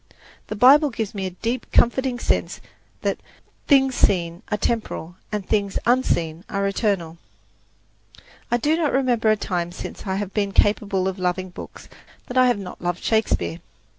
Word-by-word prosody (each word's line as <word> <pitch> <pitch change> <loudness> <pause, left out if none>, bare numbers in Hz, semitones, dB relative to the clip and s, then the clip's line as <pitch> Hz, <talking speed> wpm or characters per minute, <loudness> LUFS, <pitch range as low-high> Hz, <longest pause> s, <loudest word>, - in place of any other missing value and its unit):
The 215 - -4
Bible 280 +7 +6
gives 225 -4 -4
me 195 -2 -3
a 185 -1 -9
deep, 235 +1 -2
comforting 255 +1 +3
sense - - -1 0.4
that - - 0 0.5
"things 270 -2 +5
seen 170 -5 +1
are 210 - 0
temporal, 205 -6 -2 0.2
and 210 -2 -3
things 200 -2 0
unseen 170 -10 +1
are 200 -1 -1
eternal." 195 -5 -1 1.3
I 240 - +2
do 295 +6 +2
not 325 -3 0
remember 245 -4 +2
a 215 - +5
time 175 -3 -2
since 180 - -8
I 190 - 0
have 200 -1 -4
been 200 -2 -1
capable 200 -2 +2
of 190 0 -3
loving 185 0 -1
books - - -10 0.4
that 250 - -8
I 255 0 +6
have 245 -3 +2
not 195 -3 -8
loved 175 0 -2
Shakespeare. 85 - 0
205 Hz, 165 wpm, -23 LUFS, 185-240 Hz, 1.3 s, Bible